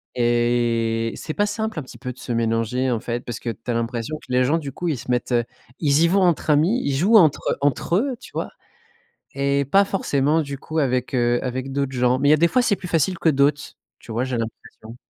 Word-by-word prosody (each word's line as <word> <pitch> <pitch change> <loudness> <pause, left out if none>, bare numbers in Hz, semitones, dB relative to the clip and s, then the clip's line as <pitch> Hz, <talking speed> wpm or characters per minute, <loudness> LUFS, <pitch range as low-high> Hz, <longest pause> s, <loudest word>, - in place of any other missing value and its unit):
et 120 -1 +1
c'est 155 - -6
pas 205 - +2
simple 220 0 -3
un - - -6
petit 130 - -13
peu 125 -1 -5
de 125 - -14
se 125 - -6
mélanger, 115 +2 0
en 115 - 0
fait, 120 +1 -4
parce 120 -1 -5
que 120 - -4
tu 115 +3 -6
as - - 0
l'impression 115 +4 -3
que 130 - -14
les 125 0 +3
gens, 145 +6 +2
du 145 -4 -5
coup, 175 +6 -5
ils 150 - 0
se 125 - -10
mettent 125 0 0 0.5
ils 145 -1 +2
y 170 - +5
vont 195 +3 +2
entre 175 -3 +1
amis, 170 - +3
ils 140 - -1
jouent 200 +10 +5
entre 160 -7 +3
entre 145 +4 0
eux, 255 +6 0
tu - - -13
vois, - - -3 0.8
et 140 0 0
pas 195 +9 +4
forcément, 155 -5 +1
du 140 -2 -5
coup, 155 +4 -4
avec, 130 -3 0
heu, 120 0 +2
avec 130 +1 -4
d'autres 140 -1 -2
gens. 125 0 +2
Mais 145 +1 +3
il - - +7
y - - +8
a 155 - +4
des 170 - +4
fois, 255 - +3
c'est 220 -4 +2
plus 180 - -8
facile 170 +2 +1
que 165 - +3
d'autres, 145 0 +2 0.4
tu 115 - -11
vois, 120 +3 -1
j'ai 130 -2 -2
l'impression. 115 0 -8
135 Hz, 245 wpm, -22 LUFS, 120-160 Hz, 0.8 s, y